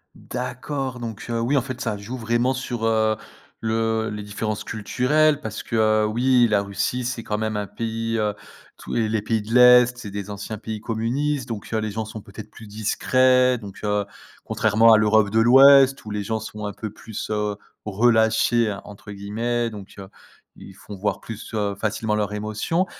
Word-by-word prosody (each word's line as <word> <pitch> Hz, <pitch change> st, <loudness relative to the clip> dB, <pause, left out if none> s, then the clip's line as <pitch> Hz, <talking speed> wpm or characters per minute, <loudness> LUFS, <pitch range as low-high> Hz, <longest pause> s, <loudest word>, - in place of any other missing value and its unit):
D'accord, 125 Hz, +1 st, -5 dB
donc 115 Hz, -3 st, -6 dB
oui, 115 Hz, +4 st, 0 dB
en 135 Hz, -, +3 dB
fait, 130 Hz, 0 st, -7 dB
ça 115 Hz, -6 st, -1 dB
joue 105 Hz, +6 st, -7 dB
vraiment 120 Hz, +2 st, +1 dB
sur, 120 Hz, -3 st, -4 dB
heu, 110 Hz, -1 st, +2 dB, 0.5 s
le 110 Hz, 0 st, 0 dB
les 105 Hz, 0 st, -6 dB
différences 105 Hz, +1 st, -4 dB
culturelles 145 Hz, +7 st, +1 dB
parce 110 Hz, -7 st, -6 dB
que -, -, -5 dB
heu, 110 Hz, -1 st, +3 dB
oui, 120 Hz, +2 st, +3 dB
la 105 Hz, -2 st, +2 dB
Russie, 100 Hz, +5 st, -2 dB
c'est 120 Hz, -1 st, -3 dB
quand 105 Hz, -, -2 dB
même 110 Hz, 0 st, -2 dB
un 105 Hz, -1 st, -2 dB
pays, 115 Hz, +2 st, -3 dB
heu, 105 Hz, -1 st, 0 dB, 0.4 s
tous -, -, -7 dB
et 115 Hz, -2 st, +1 dB
les 110 Hz, -1 st, -1 dB
pays 110 Hz, 0 st, -1 dB
de 110 Hz, +2 st, -6 dB
l'Est, 125 Hz, 0 st, +7 dB
c'est 105 Hz, -, -7 dB
des 100 Hz, 0 st, -6 dB
anciens 100 Hz, +2 st, -6 dB
pays 110 Hz, 0 st, -6 dB
communistes 125 Hz, +5 st, -2 dB
donc 110 Hz, -4 st, -6 dB
heu, -, -, +1 dB
les 110 Hz, -1 st, -3 dB
gens 110 Hz, +2 st, -3 dB
sont 110 Hz, 0 st, -8 dB
peut-être 100 Hz, +2 st, -11 dB
plus 115 Hz, -, -13 dB
discrets, 125 Hz, +4 st, +2 dB
donc, 100 Hz, -3 st, -10 dB
heu, 105 Hz, -1 st, +1 dB, 0.4 s
contrairement 110 Hz, +1 st, +4 dB
à -, -, +7 dB
l'Europe 110 Hz, -1 st, +3 dB
de 110 Hz, +2 st, +2 dB
l'Ouest 135 Hz, +3 st, +7 dB
où -, -, -7 dB
les 105 Hz, -1 st, -2 dB
gens 110 Hz, +2 st, -2 dB
sont 105 Hz, -1 st, -7 dB
un 105 Hz, -, -4 dB
peu 110 Hz, +2 st, -6 dB
plus 110 Hz, 0 st, -7 dB
heu, 105 Hz, -1 st, -1 dB, 0.3 s
«relâchés» 110 Hz, 0 st, +2 dB
entre 105 Hz, 0 st, -11 dB
guillemets 115 Hz, +4 st, -2 dB
donc 100 Hz, -3 st, -10 dB
heu, 95 Hz, -, -8 dB, 0.5 s
ils 95 Hz, -, -12 dB
font 100 Hz, +1 st, -11 dB
voir 100 Hz, 0 st, -2 dB
plus 115 Hz, 0 st, -9 dB
heu, 105 Hz, -2 st, -1 dB
facilement 105 Hz, +1 st, -1 dB
leurs 105 Hz, -1 st, -1 dB
émotions. 110 Hz, -, -1 dB
110 Hz, 190 wpm, -23 LUFS, 105-120 Hz, 0.5 s, l'Est